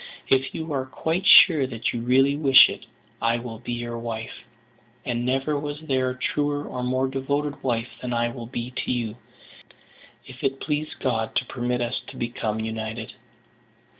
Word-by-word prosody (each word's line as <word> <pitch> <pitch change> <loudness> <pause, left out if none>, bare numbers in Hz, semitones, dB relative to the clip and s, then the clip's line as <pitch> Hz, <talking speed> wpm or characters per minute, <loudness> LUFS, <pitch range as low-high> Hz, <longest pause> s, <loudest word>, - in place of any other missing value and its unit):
If 135 0 +2
you 160 -1 -4
are 130 -1 -2
quite 165 +7 -2
sure 155 -7 +8
that 115 -2 -2
you 120 - -3
really 135 +3 +4
wish 140 -3 +7
it, - - -8 0.3
I 115 +1 +2
will 115 -2 -7
be 120 - -5
your 120 0 -4
wife; 115 -1 -6 0.6
and 120 -1 -1
never 135 +4 0
was 145 0 -5
there 130 -4 0
a 125 - -5
truer 145 +2 -1
or 125 - -4
more 130 +1 +1
devoted 140 +2 -2
wife 120 -2 -1
than 125 - -4
I 120 0 +1
will 120 -1 -7
be 120 0 -5
to - - -1
you, 115 -3 -2 1.1
if 130 -1 -12
it 135 0 0
please 150 0 -2
God 115 -4 -1
to 125 - +1
permit 125 -1 -2
us 120 +1 -2
to - - -10
become 115 -2 -2
united." 110 0 -4
125 Hz, 175 wpm, -25 LUFS, 120-135 Hz, 1.1 s, sure